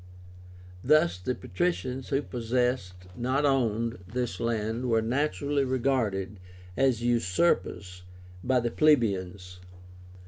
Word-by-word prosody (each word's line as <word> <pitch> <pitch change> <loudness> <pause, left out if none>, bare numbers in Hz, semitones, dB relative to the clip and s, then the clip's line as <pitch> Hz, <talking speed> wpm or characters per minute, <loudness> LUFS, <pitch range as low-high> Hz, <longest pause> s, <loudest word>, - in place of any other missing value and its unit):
Thus 125 - +3
the 125 +8 -2
patricians 135 -8 -2
who 140 0 0
possessed, 120 -7 -2
not 130 +5 0
owned, 115 -4 0
this 120 -2 -3
land 115 +2 -2
were 115 -1 +3
naturally 140 +3 0
regarded 115 -7 -1 0.4
as 130 -2 +1
usurpers 100 - 0 0.4
by 125 0 +2
the 120 0 -2
plebeians. 95 -11 +1
120 Hz, 100 wpm, -28 LUFS, 105-135 Hz, 0.4 s, Thus